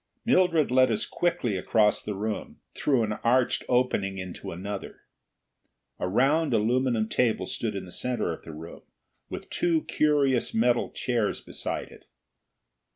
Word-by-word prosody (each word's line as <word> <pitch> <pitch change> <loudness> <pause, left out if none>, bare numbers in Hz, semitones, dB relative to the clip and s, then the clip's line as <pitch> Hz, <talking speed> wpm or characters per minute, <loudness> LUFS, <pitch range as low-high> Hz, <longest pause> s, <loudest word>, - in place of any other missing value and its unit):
Mildred 180 - +3
led 130 0 +5
us 110 - 0
quickly 125 - -1
across 105 +3 +2
the 105 - -4
room, 105 +2 -4
through 130 -5 +1
an 105 -1 -2
arched 125 +1 +2
opening 115 -6 +1
into 90 -1 -6
another. 100 +3 -6 1.0
A - - -1
round 135 - +2
aluminum 120 0 +1
table 110 -5 +1
stood 110 +2 -3
in 95 - -4
the 90 - -12
center 120 -5 -1
of - - -9
the 80 - -9
room, 80 +2 -10 0.5
with - - -7
two 165 -3 +1
curious 140 -4 +1
metal 120 +1 +2
chairs 120 -5 -1
beside - - -4
it. - - -17
120 Hz, 145 wpm, -27 LUFS, 105-130 Hz, 1.0 s, led